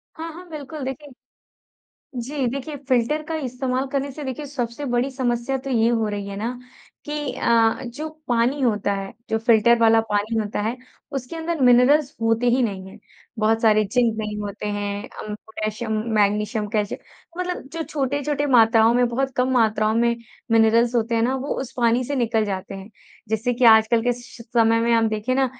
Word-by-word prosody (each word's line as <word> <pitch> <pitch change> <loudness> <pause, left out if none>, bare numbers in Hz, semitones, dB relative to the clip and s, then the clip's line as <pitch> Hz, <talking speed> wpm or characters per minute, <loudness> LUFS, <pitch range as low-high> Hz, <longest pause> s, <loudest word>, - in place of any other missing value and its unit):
हाँ, 325 0 -6
हाँ, 355 +3 -11
बिल्कुल 300 -1 -7
देखिए 285 +2 -6 1.1
जी 270 +1 -2
देखिए, 275 +4 -5
फिल्टर 255 +5 +1
का 325 - -2
इस्तेमाल 255 +1 -2
करने 280 0 -1
से 295 +2 -7
देखिए, 265 +3 -5
सबसे 250 -1 -4
बड़ी 245 +2 0
समस्या 255 0 -1
तो 270 +1 -7
ये 230 -2 +3
हो 225 -2 +1
रही 205 -1 -4
है 200 - -6
ना 220 +4 -2 0.5
कि 295 - -6 0.2
अ - - -4 0.3
अ, - - -7
जो 275 +6 -6 0.2
पानी 245 +4 +1
होता 210 -4 +1
है, 195 0 -5 0.2
जो 220 - +1
फिल्टर 230 +1 +4
वाला 225 0 +5
पानी 210 +2 0
होता 210 -1 -2
है, 225 +4 -2 0.4
उसके 260 +5 -5
अंदर 325 -1 -3
मिनरल्स 255 +4 +5
होते 225 +2 +2
ही 255 +2 +2
नहीं 195 -5 -3
हैं। - - -13 0.4
बहुत 225 +1 +2
सारे 215 -1 +4
ज़िंक 230 +2 +1
नहीं 210 -1 -3
होते 205 +1 -5
हैं, 205 0 -3 0.2
उम, 210 - -5
पोटैशियम, 220 +1 -5 0.2
मैग्नीशियम, 210 +1 +1
कैल्शियम 210 -1 -2 0.4
मतलब 360 0 -3
जो 330 0 -3
छोटे-छोटे 285 0 -1
मात्राओं 225 -3 +5
में 245 0 +3
बहुत 265 +2 -2
कम 255 +1 +2
मात्राओं 220 -2 +2
में 235 0 +2 0.3
मिनरल्स 230 +2 +4
होते 230 0 +1
हैं 225 - +2
ना, 255 +3 +1
वो 270 +2 -3
उस 265 -1 -6
पानी 240 0 +2
से 285 - -3
निकल 225 -3 +1
जाते 195 -1 -4
हैं। 195 +2 -9 0.4
जिससे 220 +3 0
कि 245 +1 0
आजकल 225 0 +6
के 245 - +2
श 245 -1 -13
समय 230 -1 +2
में 235 0 +2
हम 225 -1 +3
देखिए 215 +4 -1
ना 265 0 +3
235 Hz, 190 wpm, -22 LUFS, 220-265 Hz, 1.1 s, आजकल